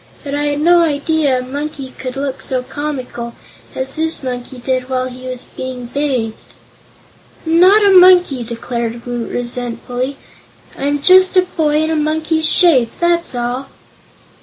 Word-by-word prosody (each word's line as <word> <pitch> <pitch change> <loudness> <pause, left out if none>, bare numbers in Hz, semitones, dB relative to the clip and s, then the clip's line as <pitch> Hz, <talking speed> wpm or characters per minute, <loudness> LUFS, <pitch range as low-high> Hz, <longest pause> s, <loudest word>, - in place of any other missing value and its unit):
But 280 - -5
I 290 0 -1
had 290 0 -1
no 345 +2 +5
idea 295 -2 +1
a 250 - -3
monkey 280 0 -6
could 255 -1 -5
look 275 -1 -4
so 255 -1 -2
comical 255 -4 -5 0.4
as 265 +3 -3
this 320 -2 +1
monkey 250 0 -5
did 255 +1 -2
while 255 -1 -1
he 255 0 -9
was 255 -1 -4
being 255 -1 -6
bathed." 250 -4 -2 1.1
"I'm 325 +1 +2
not 405 +4 +6
a 400 - +5
monkey!" 360 -8 +6
declared 235 0 -5
Woot, 240 -1 -4
resentfully; 245 +2 -4 0.6
"I'm 285 +1 -2
just 370 +2 +5
a 365 - +6
boy 310 -4 0
in 315 - -1
a - - 0
monkey's 315 +1 0
shape, 270 -11 +4
that's 345 -4 +1
all." 245 +2 -3
275 Hz, 155 wpm, -16 LUFS, 250-315 Hz, 1.1 s, not